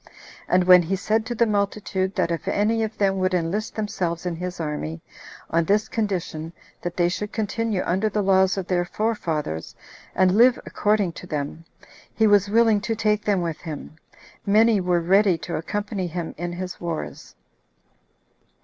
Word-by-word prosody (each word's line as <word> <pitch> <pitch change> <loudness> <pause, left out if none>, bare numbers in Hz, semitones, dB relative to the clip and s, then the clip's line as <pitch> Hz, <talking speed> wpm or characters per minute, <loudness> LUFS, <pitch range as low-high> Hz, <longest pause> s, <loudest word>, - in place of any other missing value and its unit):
And 180 0 +3
when 180 0 +8
he 175 +3 -1
said 220 +4 0
to 240 - -3
the 235 - +3
multitude, 200 -2 -1
that 175 -4 0
if 165 - -3
any 220 +2 +1
of 220 0 -3
them 195 -1 +1
would 185 0 +1
enlist 180 +6 -2
themselves 180 -5 -2
in 175 -2 -2
his 180 +1 -5
army, 155 +1 -4 0.5
on 165 +1 +3
this 210 +4 +2
condition, 175 -7 -3 0.3
that 175 -1 -5
they 175 -1 +3
should 205 +4 -3
continue 220 -2 -1
under 190 +5 +1
the 210 0 -1
laws 190 0 +3
of 190 - -2
their 180 -1 +1
forefathers, 165 - -3 0.4
and 185 0 +3
live 245 +3 +5
according 205 -3 +1
to 180 - -10
them, 150 +1 -4 0.5
he 220 - +3
was 205 -1 +4
willing 220 -1 +4
to 225 +1 -2
take 210 -1 +1
them 195 -4 +1
with 165 -2 -3
him, 155 -2 -7 0.5
many 215 0 +4
were 180 -1 +1
ready 190 +1 +4
to 165 +1 -5
accompany 205 +2 -3
him 170 -1 -5
in 175 +2 -4
his 180 +1 -6
wars. 170 -2 -5
190 Hz, 170 wpm, -23 LUFS, 175-210 Hz, 0.5 s, when